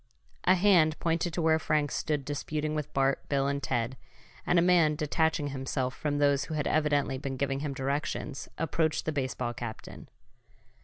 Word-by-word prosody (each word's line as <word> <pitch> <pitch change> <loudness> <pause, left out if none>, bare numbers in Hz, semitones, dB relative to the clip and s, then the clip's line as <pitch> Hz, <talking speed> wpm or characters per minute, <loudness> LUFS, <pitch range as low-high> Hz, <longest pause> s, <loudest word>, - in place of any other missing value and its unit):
A - - +6
hand 175 -5 +4
pointed 165 +1 0
to 170 - -1
where 160 0 +4
Frank 150 -2 0
stood 150 -3 -1
disputing 150 +2 -3
with 150 -2 -3
Bart, 135 0 0
Bill 140 -1 +1
and 140 0 -1
Ted, 120 0 -1 0.5
and 175 - +3
a - - +6
man, 170 -4 +4
detaching 150 0 0
himself 130 -1 -2
from 145 -1 -2
those 145 -1 +3
who 160 - -5
had 150 - -1
evidently 145 -3 +1
been 135 -1 -4
giving 135 0 -1
him 145 -1 -3
directions, 140 +1 -3
approached 160 0 0
the 155 - 0
baseball 130 -4 -2
captain. 115 -2 -8
145 Hz, 170 wpm, -29 LUFS, 135-155 Hz, 0.5 s, A